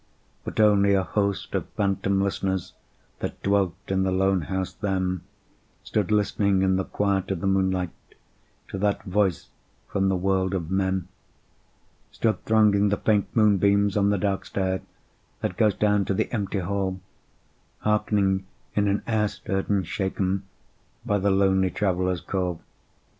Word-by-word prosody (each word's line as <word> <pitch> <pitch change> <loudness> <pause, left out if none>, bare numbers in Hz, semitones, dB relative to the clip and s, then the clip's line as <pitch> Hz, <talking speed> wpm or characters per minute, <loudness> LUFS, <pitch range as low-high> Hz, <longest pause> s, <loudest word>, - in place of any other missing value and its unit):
But - - -5
only 100 -2 +5
a 95 - +2
host 100 +2 -1
of - - -2
phantom 100 -1 +1
listeners 95 -2 -2 0.5
That - - -4
dwelt 100 -3 +2
in 95 0 +1
the 95 0 +1
lone 95 0 +2
house 95 +4 -3
then 95 -3 -1 0.6
Stood 105 -3 -1
listening 100 -2 +2
in 95 0 +3
the 95 - 0
quiet 100 -2 0
of 95 -3 -1
the 100 - -4
moonlight 95 -2 +1 0.8
To 95 - -5
that 100 0 0
voice 95 -3 0 0.4
from 95 -1 0
the 95 - +2
world 95 +1 0
of 85 -2 -4
men: 95 -1 0 1.0
Stood 110 -5 -1
thronging 105 -2 +4
the 100 - +1
faint 105 -2 +2
moonbeams 100 -2 +3
on 100 -1 +3
the 100 - +2
dark 100 0 -1
stair, 95 -1 -1 0.6
That - - -2
goes 105 -3 +3
down 105 -2 +2
to 100 - -1
the - - -1
empty 100 -3 -1
hall, 95 0 -2 0.8
Hearkening 100 -3 +1 0.3
in 105 -1 +2
an 100 +1 0
air 110 -2 +1
stirred 95 -1 -4
and 100 -3 +1
shaken 95 +1 -1 0.6
By 105 -1 +1
the 100 +1 +1
lonely 95 -1 +3
Traveller's 90 -2 0
call. 90 -4 -2
95 Hz, 150 wpm, -25 LUFS, 95-100 Hz, 1.0 s, only